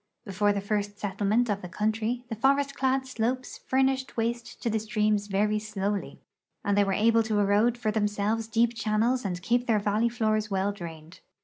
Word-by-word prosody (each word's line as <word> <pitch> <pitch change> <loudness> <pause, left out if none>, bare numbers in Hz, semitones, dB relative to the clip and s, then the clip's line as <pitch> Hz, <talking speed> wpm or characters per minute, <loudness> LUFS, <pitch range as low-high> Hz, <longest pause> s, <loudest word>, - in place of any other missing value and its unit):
Before 205 +1 +1
the 200 -1 -1
first 205 0 -2
settlement 205 +4 0
of 205 -2 -1
the 180 - -7
country" 220 +5 -1
the 230 - -4
forest 275 +4 +2
clad 265 -1 +1
slopes 255 0 -3
furnished 265 0 +1
waste 235 +1 -2
to - - -1
the 220 - +1
streams 210 -2 0
verv 210 +2 +1
slowly 205 -2 -3 0.5
and 205 - +2
they 205 - +4
were 195 - -1
able 230 +3 +4
to 220 -1 -1
erode 205 +4 +3
for 220 -3 -1
themselves 210 +1 0
deep 230 +1 +2
channels 230 +3 +1
and 180 -3 -4
keep 240 +3 +1
their 225 -2 +3
valley 210 +3 +1
floors 215 -2 0
well 195 0 0
drained. 165 -4 -9
215 Hz, 185 wpm, -27 LUFS, 205-235 Hz, 0.5 s, they